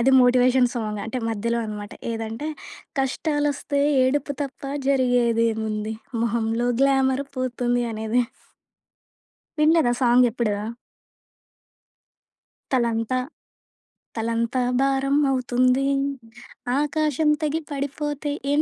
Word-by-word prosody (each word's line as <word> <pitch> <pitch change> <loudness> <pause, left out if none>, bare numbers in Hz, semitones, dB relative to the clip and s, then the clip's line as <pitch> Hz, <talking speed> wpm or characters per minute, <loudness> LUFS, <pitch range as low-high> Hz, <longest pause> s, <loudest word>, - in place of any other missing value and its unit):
అది 265 +3 +4
motivation 250 0 +4
song. 215 -3 -3
అంటే 240 +3 -3
మధ్యలో 230 +2 -1
అనమాట 210 -1 -6 0.2
ఏదంటే 225 +5 -4 0.5
'కష్టాలు 295 +2 0
వస్తే 280 0 -2 0.2
ఏడుపు 285 +2 0
తప్ప 270 -1 -7 0.3
జరిగేదేముంది 230 -4 +1 0.3
మొహంలో 230 +1 0
గ్లామరు 270 0 +2
పోతుంది' 245 -1 0
అనేది. 220 +3 0 1.4
వినలేదా 305 -5 +4
సాంగెప్పుడూ? 240 -3 +3 2.2
తలంతా, 235 -1 +1 1.0
తలంతా 230 +2 0 0.2
భారం 275 +1 +1 0.2
అవుతుంది. 255 +1 +2 0.9
ఆకాశం 300 0 +1
తెగి 310 +1 0
పడిపోతే 285 +1 -3 0.2
ఏం 295 - +3
250 Hz, 85 wpm, -23 LUFS, 230-275 Hz, 2.2 s, అది